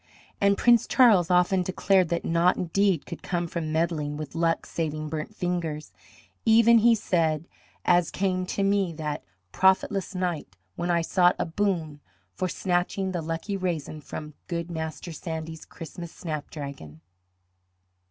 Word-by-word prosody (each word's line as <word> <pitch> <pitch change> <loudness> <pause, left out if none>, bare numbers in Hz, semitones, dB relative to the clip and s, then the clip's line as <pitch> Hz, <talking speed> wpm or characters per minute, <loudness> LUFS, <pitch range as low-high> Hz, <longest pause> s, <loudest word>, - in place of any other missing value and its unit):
And 200 0 +4
Prince 240 -2 +4
Charles 210 -9 +5
often 180 +1 +3
declared 185 0 +2
that 170 0 -1
naught 170 +2 +3
indeed 185 -1 +1
could 170 - -8
come 175 -2 -2
from 165 -2 -4
meddling 155 -2 -1
with 150 -2 -6
luck 165 0 0
saving 155 -2 -3
burnt 160 +7 -5
fingers, 170 -5 -3 0.5
"even," 230 +1 +6
he 230 +1 +5
said, 165 -6 0 0.4
"as 175 -2 +4
came 185 -1 -1
to 200 - -1
me 195 -3 +1
that 150 -2 -4 0.3
profitless 190 0 +2
night 175 - -3 0.2
when 175 - -3
I 170 -1 +2
sought 180 +1 +3
a - - -1
boon 165 -4 -1 0.3
for 185 - -2
snatching 185 +2 -1
the 175 -2 -2
lucky 165 +5 -3
raisin 165 -5 -3
from 150 +2 -7
good 170 0 -3
Master 160 0 -5
Sandy's 160 0 -6
Christmas 170 0 -9
snapdragon." 140 - -7
170 Hz, 145 wpm, -26 LUFS, 160-190 Hz, 0.5 s, even